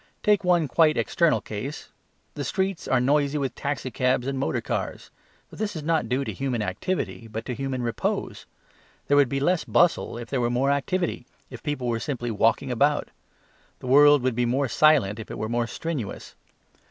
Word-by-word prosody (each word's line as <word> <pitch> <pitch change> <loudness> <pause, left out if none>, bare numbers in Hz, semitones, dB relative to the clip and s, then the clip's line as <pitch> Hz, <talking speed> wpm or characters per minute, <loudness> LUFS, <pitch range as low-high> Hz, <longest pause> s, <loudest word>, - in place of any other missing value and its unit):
Take 210 -2 +3
one 175 -3 +3
quite 155 +3 +3
external 170 -4 +2
case; 110 +8 -6 0.4
the 145 - -4
streets 190 +5 -2
are 130 - +3
noisy 140 +3 +2
with 135 -3 -2
taxicabs 130 -3 -1
and 135 0 -2
motorcars; 80 - -3 0.4
but - - -12
this 210 -3 -2
is 155 - -5
not 160 -7 0
due 130 +2 0
to - - -4
human 130 -5 -2
activity 115 - -3
but 110 0 -6
to 125 - -3
human 130 -1 -3
repose. 115 -2 -3 0.6
There 145 - +3
would 140 -3 +5
be 135 - -1
less 175 +5 +1
bustle 175 -8 +2
if 120 -1 -8
there 135 -3 0
were 120 - +1
more 130 +3 +1
activity, 140 -1 -1 0.2
if 125 -2 -9
people 145 -4 -3
were 115 -1 0
simply 120 -4 -3
walking 115 +4 +1
about. 145 +4 +1 0.7
Our 125 - -4
world 145 -1 +7
would 130 -1 +1
be 120 +1 0
more 135 +3 +1
silent 130 -8 +3
if 110 - -8
it - - -6
were 110 - -3
more 120 +1 -1
strenuous. 145 - -5
135 Hz, 185 wpm, -25 LUFS, 120-150 Hz, 0.7 s, world